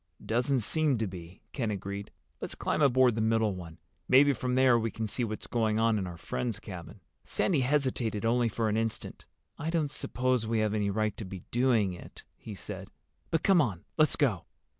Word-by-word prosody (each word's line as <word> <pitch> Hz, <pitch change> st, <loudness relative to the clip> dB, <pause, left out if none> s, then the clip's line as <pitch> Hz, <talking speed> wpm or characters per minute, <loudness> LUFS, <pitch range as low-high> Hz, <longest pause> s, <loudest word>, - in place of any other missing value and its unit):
"Doesn't 125 Hz, +3 st, +1 dB
seem 150 Hz, +3 st, +2 dB
to 110 Hz, -, 0 dB
be," 90 Hz, -2 st, -9 dB
Ken 120 Hz, -6 st, -1 dB
agreed. 100 Hz, 0 st, -4 dB, 0.3 s
"Let's -, -, -5 dB
climb -, -, -1 dB
aboard 130 Hz, -3 st, +5 dB
the 110 Hz, -, -1 dB
middle 110 Hz, -1 st, +2 dB
one. 85 Hz, -3 st, -9 dB, 0.3 s
Maybe 140 Hz, +2 st, +6 dB
from 125 Hz, +1 st, -2 dB
there 130 Hz, -2 st, +5 dB
we 115 Hz, 0 st, -1 dB
can 110 Hz, 0 st, -4 dB
see 115 Hz, +4 st, -2 dB
what's 110 Hz, -2 st, -4 dB
going 110 Hz, -2 st, 0 dB
on 115 Hz, -1 st, +3 dB
in 95 Hz, -, -3 dB
our 85 Hz, -1 st, -7 dB
friend's 65 Hz, -5 st, -3 dB
cabin." -, -, -9 dB, 0.2 s
Sandy 170 Hz, -7 st, +1 dB
hesitated 125 Hz, -5 st, 0 dB
only 120 Hz, 0 st, +2 dB
for 110 Hz, +1 st, -1 dB
an 105 Hz, 0 st, +1 dB
instant. 115 Hz, 0 st, -3 dB, 0.3 s
"I 155 Hz, -, -2 dB
don't 160 Hz, -4 st, 0 dB
suppose 125 Hz, -5 st, 0 dB
we 115 Hz, 0 st, 0 dB
have 110 Hz, -1 st, +1 dB
any 105 Hz, -2 st, 0 dB
right 110 Hz, +1 st, 0 dB
to -, -, -5 dB
be 95 Hz, -2 st, -8 dB
doing 120 Hz, -6 st, +2 dB
it," 90 Hz, -, -11 dB
he 105 Hz, -, -9 dB
said. -, -, -7 dB, 0.4 s
"But 165 Hz, -, 0 dB
come 190 Hz, -4 st, +5 dB
on. 100 Hz, -, -2 dB
Let's 155 Hz, -1 st, +4 dB
go." 115 Hz, -, +1 dB
115 Hz, 200 wpm, -30 LUFS, 105-130 Hz, 0.4 s, Maybe